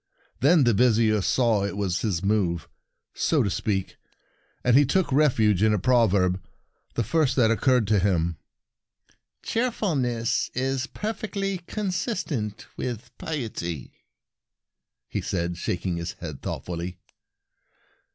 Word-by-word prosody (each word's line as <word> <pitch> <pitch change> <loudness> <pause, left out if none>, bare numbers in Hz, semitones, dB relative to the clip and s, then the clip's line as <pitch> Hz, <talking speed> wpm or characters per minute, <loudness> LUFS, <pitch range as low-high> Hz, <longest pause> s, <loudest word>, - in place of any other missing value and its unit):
Then 150 +3 +5
the 120 -2 +4
Vizier 110 -2 +3
saw 115 0 +2
it 100 - -2
v/as 95 -3 -1
his 95 -5 -1
move, 95 -5 +1 0.5
so - - +2
to 100 - -1
speak, 95 -2 -2 0.7
and 125 -1 +4
he 145 - +7
took 170 +5 +1
refuge 115 - +3
in 110 0 +4
a - - +1
proverb 100 -5 +3 0.3
— - - -42
the 120 - +1
first 145 +2 +1
that 115 -4 +4
occurred 125 +1 +3
to 105 0 +3
him: 85 -4 +1 1.1
'"Cheerfulness 145 - 0
is 130 0 -1
perfectly 200 -3 -3
consistent 180 - -2
with 120 -1 -5
piety,' 110 - -4 0.6
" - - -62
he - - -3
said, 85 -3 -2
shaking 90 0 -2
his 85 0 -4
head 75 -5 -8
thoughtfully. 90 +1 -5
110 Hz, 125 wpm, -25 LUFS, 95-135 Hz, 1.1 s, he